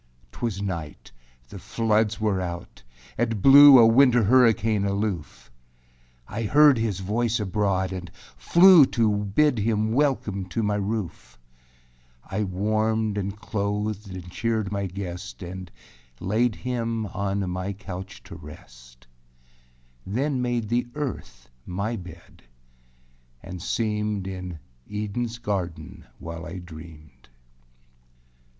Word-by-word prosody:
4. 120 - -2
âTwas 100 -2 -6
night; 85 -6 -6 0.4
the 100 - -9
floods 110 +2 0
were 105 -3 0
out; 85 -1 -7 0.4
it 115 -2 0
blew 140 +4 +9
A 115 - +8
winter 120 +1 +5
hurricane 115 -2 +3
aloof. 100 - -3 0.8
I 105 +2 -5
heard 145 +3 +5
his 105 -4 -2
voice 115 +4 0
abroad 95 -2 0
and 90 -2 -6 0.3
flew 175 -5 +7
To 110 -3 +1
bid 110 +6 +1
him 110 0 0
welcome 120 -8 0
to 110 +5 -3
my 105 0 0
roof. 105 - -4 0.9
I 105 +2 -2
warmed 110 +3 0
and 100 0 -3
clothed 105 0 -3
and 90 -1 -8
cheered 110 -2 -1
my 100 -1 -2
guest 95 0 -7
And 90 0 -7 0.5
laid 110 +4 0
him 115 -3 -3
on 100 -1 -2
my 90 +2 -3
couch 95 -1 -8
to - - -11
rest, 60 -4 -14 1.0
Then 130 - -1
made 120 -3 -1
the 120 +1 0
earth 130 - -6 0.2
my 100 - -3
bed 90 -4 -12 1.0
and 90 -1 -8
seemed 105 0 -2
In 90 -3 -6 0.3
Edenâs 110 +3 -4
garden 95 -5 -4
while 85 0 -7
I 85 +2 -7
dreamed. 80 -7 -13
105 Hz, 120 wpm, -25 LUFS, 95-115 Hz, 1.0 s, blew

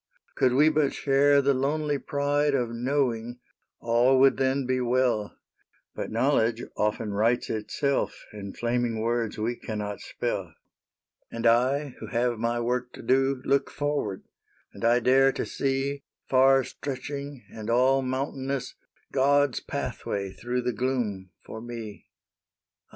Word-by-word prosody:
Could 125 - +2
we 150 +4 +5
but 150 -3 +1
share 140 0 +4
the 140 +1 +3
lonely 145 +2 0
pride 145 0 0
Of 120 -3 0
knowing, 120 -1 -1 0.4
all 120 +3 +3
would 135 0 +5
then 135 0 +1
be 130 0 0
well; 120 -4 0 0.6
But - - -5
knowledge 115 -1 +1
often 105 0 -1
writes 115 +4 +1
itself 140 +6 -2
In 100 -2 -7
flaming 120 -1 -1
words 115 -1 -1
we 115 +3 -1
cannot 105 -3 -5
spell. - - -4 0.4
" - - -48
And 115 0 -4
I, 130 +5 +3
who - - -7
have 120 -1 0
my 120 +1 0
work 125 +1 -2
to - - -10
do, 135 0 +2
Look 140 0 +2
forward; 145 -10 -2 0.5
and - - -10
I 120 +1 +4
dare 135 +3 +5
to - - -3
see, 135 +1 -1 0.3
Far 135 0 +5
stretching 140 -1 -6
and 110 0 -6
all 130 +3 +4
mountainous, 135 0 -3 0.4
God's 140 0 +3
pathway 100 -1 -4
through 120 +4 -3
the 125 0 -1
gloom 110 -6 -2 0.2
for 110 - -8
me. 115 -3 -8
125 Hz, 140 wpm, -27 LUFS, 115-135 Hz, 0.6 s, we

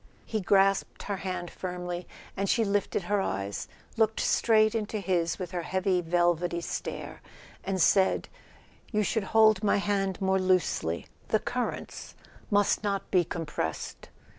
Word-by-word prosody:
He 220 -2 -2
grasped 195 +1 +2
her 200 -1 -3
hand 185 -2 -4
firmly, 180 -1 -5 0.3
and 195 0 -1
she 230 - +3
lifted 200 -1 0
her 200 +3 +1
eyes, 100 - -3 0.3
looked 220 -1 +2
straight 220 -1 +3
into 220 -1 -2
his 180 -4 0
with 185 -2 -5
her 180 -2 -2
heavy 185 +1 0
velvety 175 0 +1
stare, - - -5 0.4
and 190 -1 -2
said: 190 +3 +3 0.6
"You 215 -2 +2
should 210 0 0
hold 220 -1 +4
my 205 - +3
hand 195 -2 0
more 190 0 +2
loosely; 185 - +1 0.2
the - - +3
currents - - -4 0.3
must 205 +1 +2
not 200 -2 -2
be 180 -2 +4
compressed." 155 - -4
190 Hz, 140 wpm, -28 LUFS, 175-205 Hz, 0.6 s, hold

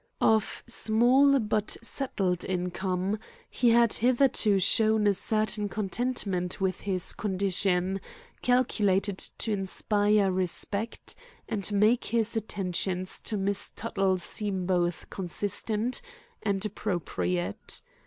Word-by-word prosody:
Of 220 -1 +2
small 255 +6 +4
but 215 -3 0
settled 195 -9 -1
income, 185 +2 -2 0.3
he 245 - +2
had 235 -1 +5
hitherto 240 -4 +3
shown 215 +2 +3
a 205 - +4
certain 215 +1 0
contentment 200 -3 -2
with 190 -1 -1
his 185 -3 -1
condition 190 -1 0 0.4
calculated 205 -6 +1
to 225 - -3
inspire 205 0 +1
respect 190 +4 -2 0.3
and 210 -2 -1
make 215 +4 +3
his 230 -1 0
attentions 185 -3 -2
to 215 - -3
Miss 200 0 0
Tuttle 195 -4 0
seem 190 +1 -2
both 175 -2 0
consistent 205 - -1 0.4
and 200 -1 -1
appropriate. 95 - -3
200 Hz, 105 wpm, -28 LUFS, 185-220 Hz, 0.4 s, had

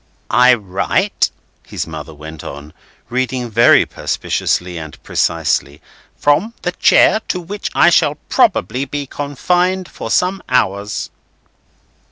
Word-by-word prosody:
"'I 125 +1 +6
write,'" 100 -4 0 0.4
his - - -4
mother 80 -1 -8
went 80 0 -10
on, 70 +2 -9 0.4
reading 125 -1 -2
very 115 +2 +5
perspicuously 90 0 -2
and 80 -2 -9
precisely, 75 -3 0 0.4
"'from 205 +11 +1
the 180 - 0
chair, 200 - +4
to 180 - -1
which 195 +4 -5
I 175 - +5
shall 150 -3 +3
probably 125 +9 +2
be 145 +1 -4
confined 180 +7 -1
for - - -7
some 185 +2 +1
hours. 100 -5 0
125 Hz, 120 wpm, -17 LUFS, -, 0.4 s, I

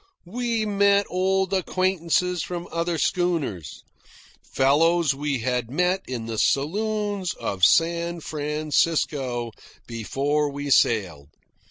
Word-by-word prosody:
We 230 +3 -2
met 200 -1 +3
old 190 +1 0
acquaintances 180 -1 0
from 175 +1 -5
other 170 0 -1
schooners, 160 - -2 0.7
fellows 155 +3 +3
we 140 -2 -2
had 125 -1 -1
met 180 +7 +1
in 120 -3 -5
the 115 -1 -4
saloons 205 - 0
of 95 -2 -5
San 170 - +3
Francisco 150 -5 -1 0.3
before 140 +6 -1
we 145 0 -5
sailed. 90 - +2
165 Hz, 100 wpm, -24 LUFS, 135-185 Hz, 0.7 s, met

